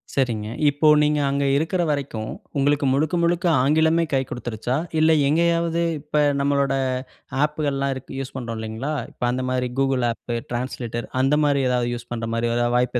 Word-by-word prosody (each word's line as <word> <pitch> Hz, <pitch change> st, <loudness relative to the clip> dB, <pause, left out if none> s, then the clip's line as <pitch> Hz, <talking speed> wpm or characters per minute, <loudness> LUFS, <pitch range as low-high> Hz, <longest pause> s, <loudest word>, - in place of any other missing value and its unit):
சரிங்க. 115 Hz, -6 st, 0 dB, 0.2 s
இப்போ 145 Hz, +2 st, +1 dB, 0.2 s
நீங்க 150 Hz, 0 st, +2 dB
அங்க 140 Hz, 0 st, 0 dB
இருக்குற 170 Hz, +5 st, 0 dB
வரைக்கும் 140 Hz, -7 st, -2 dB, 0.3 s
உங்களுக்கு 145 Hz, +1 st, +2 dB
முழுக்க, 155 Hz, +5 st, +1 dB
முழுக்க 175 Hz, +2 st, +1 dB, 0.2 s
ஆங்கிலமே 160 Hz, +3 st, +3 dB
கை 135 Hz, -, +3 dB
குடுத்துடுருச்சா 120 Hz, +2 st, -3 dB, 0.2 s
இல்ல 160 Hz, +1 st, +5 dB, 0.2 s
எங்கேயாவது 170 Hz, +1 st, +2 dB, 0.2 s
இப்ப 150 Hz, 0 st, 0 dB, 0.2 s
நம்மளோட 140 Hz, -1 st, +1 dB, 0.7 s
ஆப்புகல்லாம் 145 Hz, -2 st, -2 dB, 0.3 s
யூசு 135 Hz, -, -6 dB
பண்றோம் 115 Hz, -3 st, -5 dB
இல்லைங்களா 110 Hz, +7 st, -4 dB, 0.2 s
இப்ப 125 Hz, -, -4 dB
அந்த 130 Hz, +1 st, -2 dB
மாரி 125 Hz, -1 st, -1 dB
கூகுள் 135 Hz, -2 st, +1 dB
ஆப் 120 Hz, +1 st, -6 dB, 0.2 s
டிரான்ஸ்லேட்டர் 120 Hz, -1 st, -4 dB
அந்த 140 Hz, +3 st, +3 dB
மாரி 140 Hz, -1 st, +2 dB
ஏதாவது 120 Hz, -1 st, +1 dB
யூஸ் 120 Hz, 0 st, -10 dB
பண்ற 115 Hz, -1 st, -3 dB
மாரி 115 Hz, 0 st, 0 dB
ஏதா 120 Hz, 0 st, +2 dB
வாய்ப்பு 125 Hz, 0 st, +1 dB
135 Hz, 155 wpm, -23 LUFS, 120-150 Hz, 0.7 s, இல்ல